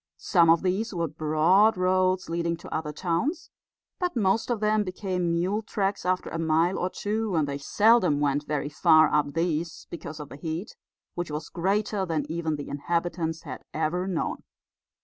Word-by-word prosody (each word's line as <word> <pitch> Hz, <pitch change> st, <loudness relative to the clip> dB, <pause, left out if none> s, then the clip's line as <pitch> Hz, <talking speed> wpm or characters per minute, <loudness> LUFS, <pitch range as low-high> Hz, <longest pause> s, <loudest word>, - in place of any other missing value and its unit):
Some 165 Hz, -, +3 dB
of 165 Hz, +1 st, +5 dB
these 195 Hz, +3 st, -1 dB
were 170 Hz, -1 st, 0 dB
broad 155 Hz, +8 st, +3 dB
roads 185 Hz, 0 st, +2 dB
leading 170 Hz, 0 st, -1 dB
to -, -, -9 dB
other 155 Hz, -1 st, -2 dB
towns, 190 Hz, -, -2 dB, 0.5 s
but 360 Hz, -4 st, -1 dB
most 220 Hz, +1 st, +1 dB
of 240 Hz, -3 st, 0 dB
them 215 Hz, 0 st, +2 dB
became 185 Hz, -2 st, -2 dB
mule 185 Hz, +6 st, 0 dB
tracks 200 Hz, -3 st, -2 dB
after 185 Hz, 0 st, 0 dB
a 165 Hz, -, -3 dB
mile 165 Hz, +3 st, +2 dB
or 180 Hz, -, 0 dB
two; 210 Hz, 0 st, -2 dB
and 155 Hz, -3 st, +2 dB
they 140 Hz, 0 st, -4 dB
seldom 205 Hz, -1 st, +3 dB
went 145 Hz, 0 st, 0 dB
very 150 Hz, -1 st, -1 dB
far 155 Hz, +1 st, +4 dB
up 145 Hz, 0 st, +1 dB
these 165 Hz, -1 st, -1 dB
because 160 Hz, -2 st, -7 dB
of 150 Hz, -1 st, -8 dB
the -, -, -10 dB
heat, 160 Hz, +5 st, -5 dB, 0.4 s
which 175 Hz, -3 st, -4 dB
was 150 Hz, +1 st, -5 dB
greater 200 Hz, +3 st, 0 dB
then 165 Hz, -4 st, -1 dB
even 160 Hz, -1 st, -1 dB
the 145 Hz, -, -6 dB
inhabitants 165 Hz, +2 st, -2 dB
had 130 Hz, -6 st, -8 dB
ever 165 Hz, +4 st, -1 dB
known. 180 Hz, -4 st, -2 dB
170 Hz, 175 wpm, -26 LUFS, 155-190 Hz, 0.5 s, of